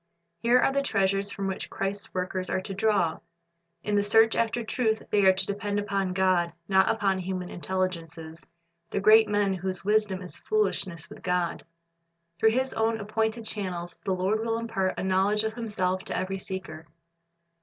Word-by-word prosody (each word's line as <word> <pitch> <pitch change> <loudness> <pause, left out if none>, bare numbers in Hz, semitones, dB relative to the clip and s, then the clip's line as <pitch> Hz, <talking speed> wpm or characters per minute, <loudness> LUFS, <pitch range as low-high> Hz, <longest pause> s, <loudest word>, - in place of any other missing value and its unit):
Here 235 +6 +4
are 255 - +3
the 280 - +2
treasures 195 -5 0
from 200 0 -4
which 190 -1 -3
Christ's 195 +1 -3
workers 185 0 -3
are - - 0
to 195 +1 -6
draw. 195 -5 +1 0.6
In 210 - -2
the 205 - +4
search 225 +2 +4
after 230 +1 0
truth 220 -1 0
they 205 -1 +3
are 190 - +8
to 185 - -1
depend 205 0 -2
upon 195 -2 -1
God, 185 -2 +2
not 190 -1 +4
upon 195 -4 +1
human 185 -1 -4
intelligences, 170 -3 -4 0.5
the - - -1
great 215 +2 +6
men 205 -1 +2
whose 190 0 -4
wisdom 210 -3 +1
is 180 - -6
foolishness 190 - -1
with - - -12
God. 180 -2 -1 0.8
Through 220 - +5
His 260 +4 0
own 225 0 0
appointed 220 +2 -1
channels 180 -5 -3
the 195 - 0
Lord 190 +4 0
will 225 0 0
impart 225 -5 -2
a - - -2
knowledge 190 +3 +2
of 220 0 -2
Himself 190 -5 -2
to - - -3
every 190 +1 -2
seeker. 165 -5 -7
195 Hz, 175 wpm, -27 LUFS, 185-220 Hz, 0.8 s, are